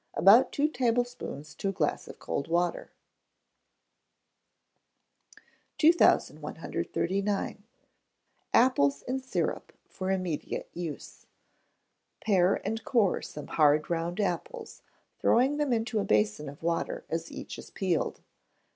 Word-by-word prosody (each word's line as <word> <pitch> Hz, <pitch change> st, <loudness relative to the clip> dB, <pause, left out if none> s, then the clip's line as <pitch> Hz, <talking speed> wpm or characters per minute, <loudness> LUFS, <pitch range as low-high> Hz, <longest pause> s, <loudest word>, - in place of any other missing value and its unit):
About 200 Hz, +8 st, +6 dB
two 290 Hz, +1 st, +2 dB
tablespoonfuls 245 Hz, -, -2 dB
to 195 Hz, -, -1 dB
a -, -, 0 dB
glass 160 Hz, -6 st, -1 dB
of -, -, -10 dB
cold 140 Hz, -, -3 dB
water. 175 Hz, +1 st, -1 dB, 2.9 s
2139. 205 Hz, -, +1 dB, 0.9 s
Apples 140 Hz, -, +3 dB
in 260 Hz, +1 st, -2 dB
Syrup 260 Hz, 0 st, -3 dB
for 185 Hz, 0 st, -5 dB
Immediate 185 Hz, -5 st, -2 dB
Use. 165 Hz, -4 st, -7 dB, 1.0 s
Pare 190 Hz, -3 st, +4 dB
and 225 Hz, 0 st, -2 dB
core 225 Hz, -7 st, +2 dB
some 150 Hz, -, -8 dB
hard 150 Hz, +1 st, +3 dB
round 170 Hz, +3 st, -2 dB
apples, 435 Hz, -, -3 dB, 0.4 s
throwing 265 Hz, +5 st, +3 dB
them 295 Hz, -3 st, 0 dB
into 225 Hz, -1 st, 0 dB
a -, -, 0 dB
basin 105 Hz, -, +1 dB
of 145 Hz, +3 st, -13 dB
water 170 Hz, 0 st, -2 dB
as 165 Hz, 0 st, -4 dB
each -, -, -8 dB
is -, -, -11 dB
peeled. 180 Hz, -5 st, -1 dB
190 Hz, 110 wpm, -29 LUFS, 165-240 Hz, 2.9 s, About